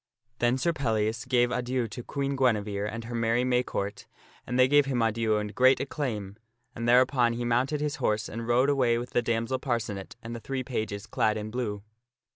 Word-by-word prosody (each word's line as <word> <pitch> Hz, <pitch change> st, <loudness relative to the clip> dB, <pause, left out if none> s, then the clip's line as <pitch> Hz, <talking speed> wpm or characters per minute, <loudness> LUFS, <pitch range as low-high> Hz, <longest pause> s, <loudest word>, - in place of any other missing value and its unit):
Then 120 Hz, +2 st, +2 dB
Sir 170 Hz, +6 st, +1 dB
Pellias 115 Hz, -4 st, -1 dB
gave 120 Hz, -1 st, +2 dB
adieu 125 Hz, -1 st, -1 dB
to 120 Hz, -, -7 dB
Queen 140 Hz, +2 st, -2 dB
Guinevere, 105 Hz, -5 st, +1 dB
and 115 Hz, +2 st, -6 dB
her 120 Hz, +1 st, -7 dB
merry 115 Hz, +1 st, +1 dB
May 125 Hz, -1 st, +2 dB
court, 100 Hz, -4 st, -4 dB, 0.4 s
and 125 Hz, -, -1 dB
they 130 Hz, 0 st, +6 dB
gave 145 Hz, 0 st, +4 dB
him 130 Hz, -3 st, 0 dB
adieu 115 Hz, -1 st, +1 dB
and 105 Hz, 0 st, -3 dB
great 130 Hz, +1 st, +5 dB
acclaim, 110 Hz, -9 st, -4 dB, 0.4 s
and 115 Hz, +1 st, -2 dB
thereupon 125 Hz, -1 st, +4 dB
he 120 Hz, +1 st, -3 dB
mounted 130 Hz, +5 st, +1 dB
his 150 Hz, -1 st, -2 dB
horse 110 Hz, -5 st, 0 dB
and 115 Hz, +1 st, -6 dB
rode 125 Hz, +4 st, +3 dB
away 125 Hz, -4 st, +2 dB
with 120 Hz, +1 st, -5 dB
the 120 Hz, -, +2 dB
damsel 115 Hz, +2 st, -1 dB
Parcenet 115 Hz, -7 st, -3 dB
and 115 Hz, +1 st, -6 dB
the -, -, -5 dB
three 130 Hz, +2 st, -4 dB
pages 110 Hz, -5 st, -4 dB
clad 110 Hz, -1 st, +1 dB
in 105 Hz, 0 st, -5 dB
blue. 105 Hz, -4 st, -3 dB
120 Hz, 200 wpm, -28 LUFS, 110-130 Hz, 0.4 s, they